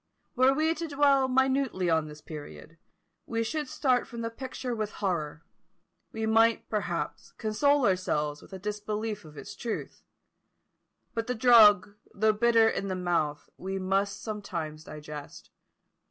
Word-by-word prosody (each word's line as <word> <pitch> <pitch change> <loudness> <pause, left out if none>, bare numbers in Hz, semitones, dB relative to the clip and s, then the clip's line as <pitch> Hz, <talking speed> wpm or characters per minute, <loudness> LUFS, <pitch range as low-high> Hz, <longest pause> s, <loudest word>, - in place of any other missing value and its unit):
Were 255 +1 +5
we 310 +4 +2
to 330 0 -5
dwell 280 -2 +3
minutely 265 -7 +1
on 160 -2 +2
this 150 0 -11
period, 155 +1 -10 0.5
we 230 -1 -1
should 295 +5 -3
start 255 -2 +1
from 235 -1 -7
the 230 0 -3
picture 255 0 -5
with 215 -2 -3
horror: 165 -5 -3 0.7
we 220 0 -3
might, 225 +1 +3
perhaps, 195 -6 -3
console 275 +5 +2
ourselves 150 -6 0
with - - -16
a 190 - -6
disbelief 210 0 -4
of 150 -1 -14
its - - -8
truth; 235 -2 -5 1.1
but 230 0 -3
the 250 - -1
drug, 215 -5 +6 0.2
though 215 +2 +3
bitter 230 +1 +4
in 200 - -1
the 190 - -2
mouth, 170 -5 -1
we 190 +1 -4
must 195 +1 -1
sometimes 170 -8 -5
digest. 150 -1 -9
210 Hz, 145 wpm, -28 LUFS, 175-240 Hz, 1.1 s, drug